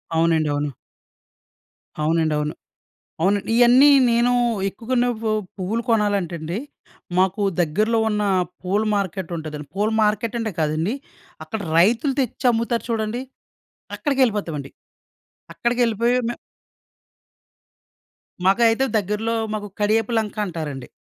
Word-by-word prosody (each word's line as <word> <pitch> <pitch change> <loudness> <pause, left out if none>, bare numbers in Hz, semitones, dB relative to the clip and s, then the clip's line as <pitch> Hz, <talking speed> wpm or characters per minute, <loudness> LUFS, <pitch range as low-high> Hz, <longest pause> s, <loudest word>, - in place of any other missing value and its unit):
అవునండి, 160 -2 +2
అవును. 145 0 -1 1.3
అవునండి 160 0 +1
అవును. 150 0 -2 0.7
అవునండి 200 +5 +1
ఇయన్నీ 245 +4 +7 0.2
నేను 235 +1 +3 0.4
ఎక్కువగున్నప్పుడు 230 +1 -1 0.2
పువ్వులు 205 +5 -2
కొనాలంటే 205 -6 +1
అండి, 165 +5 -3 0.6
మాకు 190 +2 +2 0.2
దగ్గరలో 210 +8 +1
ఉన్న 210 -1 0 0.4
పూల 195 +3 0
మార్కెట్ 190 -2 -3
ఉంటదండి. 155 -2 -6
పూల 210 +2 +1
మార్కెటంటే 220 +1 0
కాదండి, 155 +8 0 0.5
అక్కడ 220 - -5 0.2
రైతులు 235 - +3
తెచ్చి 255 0 -2
అమ్ముతారు 230 +1 -1
చూడండి, 225 +2 -1 0.8
అక్కడికేళ్ళిపోతామండి. 210 - 0 0.8
అక్కడికెళ్ళిపోయి 235 0 +1
మేం 240 - -4 2.1
మాకైతే 225 +6 +4
దగ్గర్లో 210 +3 -1 0.2
మాకు 210 -1 -4
'కడియపు 215 +2 +1
లంక' 215 -1 -2
అంటారండి. 155 -8 -5
210 Hz, 95 wpm, -22 LUFS, 170-230 Hz, 2.1 s, ఇయన్నీ